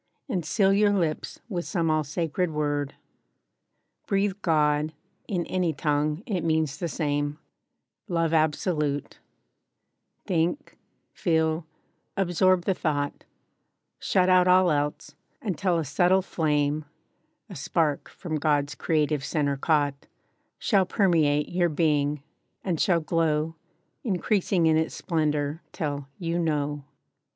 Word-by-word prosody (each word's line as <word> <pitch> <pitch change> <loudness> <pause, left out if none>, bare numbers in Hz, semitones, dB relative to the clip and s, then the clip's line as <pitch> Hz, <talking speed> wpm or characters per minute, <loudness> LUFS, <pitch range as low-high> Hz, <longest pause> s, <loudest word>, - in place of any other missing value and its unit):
And 190 - -1
seal 190 +6 +3
your 205 0 +4
lips 165 -6 -2
with 180 -7 -3
some 165 -5 0
all 155 0 +2
sacred 165 +4 -1
word. 145 -2 -2 1.1
Breathe 200 -1 +1
"God," 150 -2 +2 0.3
in 180 -5 -1
any 180 -2 0
tongue—it 150 - -1
means 160 -3 0
the 170 - -1
same; 145 -2 -1 0.7
LOVE 165 -3 0
ABSOLUTE: 150 -2 0 1.1
Think, 175 - -1 0.3
feel, 160 -2 0 0.5
absorb 185 -1 +2
the 195 - +2
thought; 145 -4 -2 0.7
Shut 185 -1 +2
out 185 -1 +5
all 180 -1 +5
else; 145 0 -2 0.3
until 185 -3 0
a 165 - -1
subtle 180 +7 +3
flame 150 -3 0 0.6
(A 195 - -10
spark 150 0 0
from 160 -4 -4
God's 145 -1 +1
creative 150 -1 0
center 145 -2 0
caught) 145 -1 0 0.5
Shall 195 -5 +2
permeate 155 -7 +2
your 175 -1 +1
being, 150 -2 +1 0.4
and 175 -5 -1
shall 175 -5 +3
glow, 160 -1 0 0.5
Increasing 190 -3 +1
in 160 -1 +4
its 160 0 -1
splendor, 150 -1 -1
till, 145 -3 -3
YOU 170 0 -2
KNOW. 145 -3 -1
160 Hz, 115 wpm, -26 LUFS, 150-180 Hz, 1.1 s, out